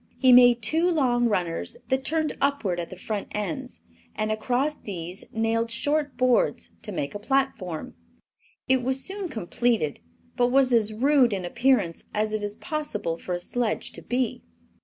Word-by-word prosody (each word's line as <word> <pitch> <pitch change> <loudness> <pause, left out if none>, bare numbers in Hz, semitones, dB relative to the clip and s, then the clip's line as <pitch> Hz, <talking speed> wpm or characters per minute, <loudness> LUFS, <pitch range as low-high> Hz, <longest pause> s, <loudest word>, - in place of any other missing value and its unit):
He 260 -1 +6
made 245 -1 +7
two 320 +11 +3
long 250 -7 +2
runners 180 - -1
that 265 0 +1
turned 315 +1 0
upward 270 -11 0
at 170 - -4
the - - -8
front 205 +2 -4
ends, 210 +6 -4 0.3
and 215 0 -1
across 255 +7 0
these 180 -2 -7
nailed 225 +1 0
short 290 +4 -1
boards, 255 -1 +2
to 210 - -6
make 145 -7 -3
a 205 - -5
platform. 220 - -1 0.7
It 260 -1 +3
was 265 +2 -1
soon 385 -1 -4
completed, 220 - 0 0.4
but 245 - +3
was 260 0 +3
as 220 -2 +3
rude 255 +1 +3
in 190 -2 -3
appearance 210 -4 +1
as 215 0 0
it 215 -1 -1
is 205 0 -4
possible 215 - -3
for 180 - -4
a - - -3
sledge 235 +5 -2
to - - -9
be. 250 0 -1
240 Hz, 165 wpm, -26 LUFS, 205-265 Hz, 0.7 s, made